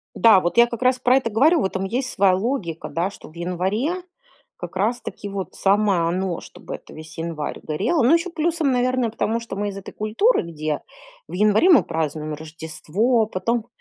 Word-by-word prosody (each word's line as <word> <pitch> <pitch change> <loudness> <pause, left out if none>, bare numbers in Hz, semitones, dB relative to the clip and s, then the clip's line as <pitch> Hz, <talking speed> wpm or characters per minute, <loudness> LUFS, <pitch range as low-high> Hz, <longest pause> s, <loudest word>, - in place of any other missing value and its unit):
Да. 220 -5 +6
Вот 175 +5 -2
я 235 0 +7
как 235 0 -6
раз 255 0 +3
про 255 +1 +4
это 235 -4 -1
говорю. 300 +9 +4
В - - +1
этом 190 0 -2
есть 250 +6 -1
своя 195 -1 +3
логика, 190 - -3
да, 175 +4 -1
что 200 - -13
в 160 - -20
январе 190 - -1 0.6
как - - -7
раз 220 +6 0
таки 205 - -7
вот 195 -1 -5
самое 200 -2 +2
оно, 180 0 -2
чтобы - - -10
это - - -14
весь 155 +1 -11
январь 160 -3 -4
горело. 205 - 0
Ну 260 - +5
ещё 335 +1 -1
плюсом, 325 -3 0
наверное, 250 -1 +1
потому 225 +1 -1
что 230 -4 -7
мы 205 +1 -2
из 195 - -7
этой 195 - -9
культуры, 225 - +2
где 155 -2 -3 0.5
в - - -11
январе 210 - +4
мы 330 -8 +7
празднуем 155 -1 -3
Рождество, 160 - -1
потом 225 +4 -2
205 Hz, 195 wpm, -22 LUFS, 175-245 Hz, 0.6 s, я